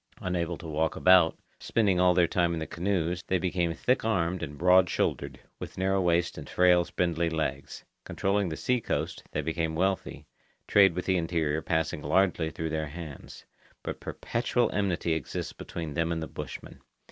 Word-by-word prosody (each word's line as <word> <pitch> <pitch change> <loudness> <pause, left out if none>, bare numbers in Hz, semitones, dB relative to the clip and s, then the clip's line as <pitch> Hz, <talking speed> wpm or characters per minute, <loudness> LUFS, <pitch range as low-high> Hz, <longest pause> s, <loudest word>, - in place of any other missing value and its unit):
Unable 90 -2 -2
to 85 - -11
walk 80 +1 -1
about, 90 -3 +5 0.2
spending 100 -5 +1
all 90 -1 +4
their 90 -1 +5
time 85 0 +1
in 80 - -2
the 80 - -3
canoes, 90 -1 -1
they 95 - +2
became 90 -1 0
thick 125 +7 +1
armed 90 -5 0
and 75 -3 -6
broad 90 +1 +5
shouldered, - - -2 0.2
with - - -8
narrow 95 +1 +1
waists 85 -1 +1
and - - -10
frail 90 -1 +4
spindly 85 -1 -1
legs. 75 -4 -4 0.2
Controlling 100 -1 0
the 80 - -5
sea 125 -1 0
coast, - - -3
they 75 - -2
became 80 +1 -2
wealthy, 95 +3 -1 0.4
trade 95 -4 +5
with 90 - -3
the 95 -1 +2
interior 80 -3 0
passing 80 -2 -1
largely 85 +1 +2
through 80 0 -4
their 80 -1 -2
hands. 75 -2 -9 0.4
But - - -5
perpetual 120 0 -1
enmity 90 -5 0
exists 80 -3 -4
between 80 -3 -6
them 85 +2 0
and 80 -1 -2
the - - -5
bushmen. - - -8
85 Hz, 175 wpm, -28 LUFS, 80-95 Hz, 0.4 s, about